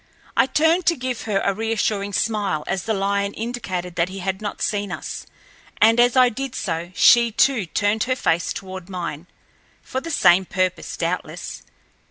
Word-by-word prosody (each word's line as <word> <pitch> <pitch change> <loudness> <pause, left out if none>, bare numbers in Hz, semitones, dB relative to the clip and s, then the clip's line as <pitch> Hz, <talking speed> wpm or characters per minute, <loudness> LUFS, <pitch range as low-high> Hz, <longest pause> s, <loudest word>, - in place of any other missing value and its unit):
I - - +4
turned 320 +5 +2
to 340 - +4
give 255 -3 -4
her 205 -3 0
a 200 - +1
reassuring 210 -1 -1
smile 205 -8 0
as 190 -2 -2
the 220 - 0
lion 200 +1 -1
indicated 185 -7 -4
that 170 +1 +1
he 190 - -8
had 190 +1 -3
not 205 -1 -5
seen 205 -2 -1
us, - - -6 0.5
and 225 +2 +5
as 245 +1 +4
I 255 -1 +7
did 270 +3 -5
so 170 -1 -3
she, 235 -1 +6
too, 225 -3 +2
turned 205 +5 0
her 255 0 0
face 170 -8 0
toward 190 -1 -7
mine, 175 -3 -5 0.6
for 260 - -4
the 330 - -7
same 190 - +4
purpose, 185 -1 -2
doubtless. - - -4
205 Hz, 175 wpm, -22 LUFS, 185-240 Hz, 0.6 s, I